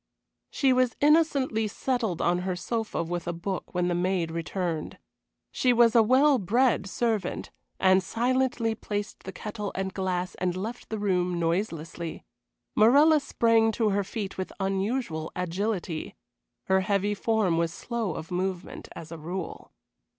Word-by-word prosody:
She 270 -2 +2
was 255 -2 +2
innocently 285 -7 +3
settled 225 -4 -1
on 175 +1 +2
her 180 0 -2
sofa 220 0 -2
with 175 +1 -4
a 175 - -1
book 180 +2 -5
when 180 0 +1
the 180 - +1
maid 175 -1 0
returned. 165 -1 -3 0.5
She 250 -1 +2
was 235 -1 +5
a 235 - +7
well 260 +4 +4
bred 225 +1 +2
servant, 220 -4 -1 0.3
and 190 0 +5
silently 240 +2 0
placed 205 -1 -5
the 190 - -5
kettle 210 +1 -5
and 190 0 -2
glass 185 -1 -2
and 180 -1 -2
left 225 +6 -5
the 220 - -2
room 180 -3 0
noiselessly. 170 -1 -2 0.5
Morella 290 +8 +6
sprang 230 -5 +3
to 220 -1 +1
her 200 0 +1
feet 200 -1 -5
with 185 - -3
unusual 195 -3 -1
agility. 180 -1 -2 0.5
Her 190 0 +2
heavy 200 +1 +1
form 205 -5 +1
was 165 -1 0
slow 225 -1 -3
of 160 - -7
movement 185 0 -3
as 165 -1 -9
a 165 - -7
rule. 175 +3 -6
195 Hz, 150 wpm, -27 LUFS, 180-230 Hz, 0.5 s, a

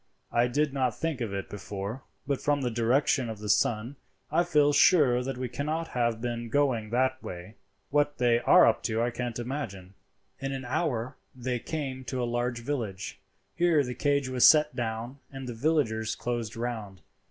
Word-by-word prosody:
I 120 +1 +3
did 145 +3 0
not 130 -4 0
think 160 -6 -2
of 115 -4 -2
it 100 -1 -4
before, 100 +4 -6 0.2
but 140 -2 -1
from 145 -1 +1
the 125 -2 -1
direction 120 +2 +2
of 110 - -5
the 105 +1 -7
sun 110 +5 +1 0.3
I 175 - +3
feel 150 -4 +3
sure 140 -7 +5
that 135 0 -4
we 130 0 -2
cannot 155 +6 -3
have 120 -2 0
been 120 -1 -3
going 125 -5 +1
that 130 +2 +1
way. 90 +3 -8 0.4
What 145 0 +2
they 120 -1 +3
are - - +6
up - - +3
to 110 0 0
I 120 +1 +1
can't 120 0 -4
imagine." 115 -7 -5 0.5
In 135 0 -3
an 135 -1 -5
hour 125 -2 -1 0.2
they 125 -1 -2
came 135 -2 -4
to 130 - -3
a 120 - 0
large 120 0 -1
village. 115 -8 -4 0.4
Here 170 -4 +3
the 125 -1 -4
cage 140 +2 +1
was 130 -1 +5
set 150 -1 +5
down 120 +2 -4
and 135 -1 -7
the 120 - -4
villagers 115 -4 0
closed 120 -3 -3
round. 110 -5 -4
125 Hz, 185 wpm, -28 LUFS, 115-140 Hz, 0.5 s, are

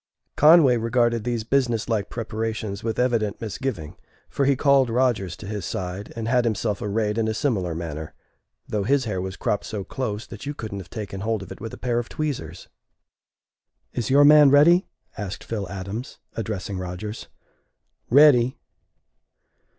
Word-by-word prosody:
Conway 150 -5 +6
regarded 115 0 +1
these 120 -2 -1
business 120 -2 0
like 110 -4 -1
preparations 110 -3 -4
with 115 -1 -2
evident 115 -5 0
misgiving, 110 - -4 0.4
for 140 - 0
he 140 0 +4
called 135 -2 +4
Rodgers 115 -7 +1
to - - -10
his 105 0 -4
side, 95 +2 -5
and 115 -1 -4
had 125 +1 +3
himself 110 -2 -1
arrayed 105 +1 -1
in 110 - +1
a 110 - -1
similar 95 - -1
manner, 80 -2 -6 0.5
though 105 - -1
his 130 +5 +1
hair 95 -4 -2
was 95 0 -5
cropped 105 - -1
so 105 -3 -4
close 110 -1 -4
that - - -10
you 145 - -3
couldn't 105 -5 -6
have 95 - -10
taken 100 -4 -6
hold 110 -1 -1
of - - -12
it - - -9
with 115 0 -5
a - - -9
pair 120 -1 0
of 120 - -5
tweezers. 120 - -4 1.3
"Is 120 -3 -2
your 140 +2 +6
man 150 -1 +8
ready?" 165 +6 +5 0.3
asked 105 -1 -5
Phil 105 -5 -4
Adams, 100 +7 -6 0.2
addressing 100 -3 -4
Rodgers. 90 +5 -6 0.8
"Ready!" 130 -2 +6
110 Hz, 165 wpm, -24 LUFS, 100-125 Hz, 1.3 s, man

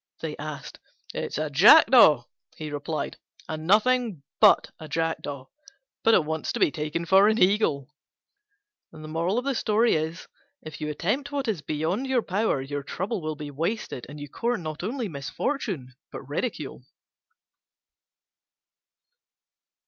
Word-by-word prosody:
they - - -4
asked. - - -7 0.3
"It's - - -4
a 155 0 -2
Jackdaw," 210 - +7 0.3
he 155 -1 -6
replied, 145 +2 -4 0.3
"and 155 0 -5
nothing 220 - +2 0.2
but - - +5
a 155 - -8
Jackdaw: 150 -4 -3 0.6
but 225 - +5
it 155 - +3
wants 160 0 -2
to - - -3
be - - +3
taken 155 +2 -3
for 195 +4 +6
an 220 0 +3
Eagle." 180 - +2 1.0
If 170 - -2
you 150 - -2
attempt 215 - -2
what 280 -3 -2
is 205 -8 -1
beyond 160 - -2
your 255 -3 +1
power, 195 -8 0
your 145 +1 -4
trouble 190 - -4
will 155 0 -3
be 150 -1 -7
wasted 165 - -3
and 145 +1 -9
you 145 - -7
court 235 - -2
not 155 -1 -6
only 235 +5 -3
misfortune 150 - -4 0.2
but - - -7
ridicule. - - -4
165 Hz, 125 wpm, -26 LUFS, 150-220 Hz, 1.0 s, Jackdaw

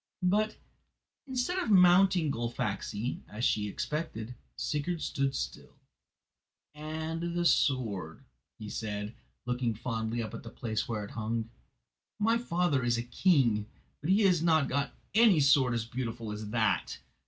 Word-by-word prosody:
But, 210 +4 +2 0.7
instead 265 +8 -1
of 305 - -2
mounting 180 -4 +5
Gullfaxi, 115 -1 -3
as 110 +3 -2
she 105 -1 +1
expected, 120 -1 -4 0.2
Sigurd 150 - -2
stood 140 -2 -1
still. - - -5 1.0
"And 160 +3 -4
the 175 - +1
sword," 110 - +1 0.3
he 110 - -8
said, 105 0 -4 0.3
looking 125 -2 -1
fondly 115 0 -2
up 110 - -6
to - - -6
the 115 - -9
place 110 -2 -3
where 110 -3 -3
it - - -11
hung. 115 0 -3 0.7
"My 225 +2 +2
father 175 - +1
is 120 0 +2
a 115 - -2
king, 120 - +2 0.3
but 150 - -3
he 200 +3 +5
has 180 -5 +4
not 160 -4 +3
got 140 +1 -1 0.2
any 215 -6 +6
sword 135 -4 +4
so 110 - -4
beautiful 115 -3 -4
as 105 0 -6
that. 110 -5 0
130 Hz, 140 wpm, -30 LUFS, 110-170 Hz, 1.0 s, any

